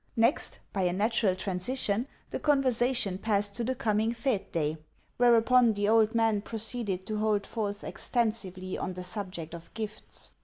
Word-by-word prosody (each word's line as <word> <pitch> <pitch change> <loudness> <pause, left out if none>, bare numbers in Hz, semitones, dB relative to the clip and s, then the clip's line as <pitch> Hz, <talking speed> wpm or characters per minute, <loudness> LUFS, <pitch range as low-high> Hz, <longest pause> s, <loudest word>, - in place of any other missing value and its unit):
Next, 230 +6 +2 0.2
by 195 - 0
a 180 -1 +2
natural 205 -1 +2
transition, 200 +5 -1 0.2
the - - -2
conversation 250 -8 +1
passed 205 -1 0
to 240 - -1
the 260 +3 -1
coming 220 -1 +1
fête 230 -5 -1
day; 155 -1 0 0.4
whereupon, 240 0 +5
the 205 0 0
old 220 +1 +4
man 225 -3 +3
proceeded 220 -4 -2
to 215 0 -2
hold 210 -1 +1
forth 205 -2 -3
extensively 195 -6 -2
on 185 - -3
the 180 - -5
subject 180 -4 -5
of 170 0 -10
gifts. 215 -1 -6
215 Hz, 155 wpm, -29 LUFS, 195-230 Hz, 0.4 s, whereupon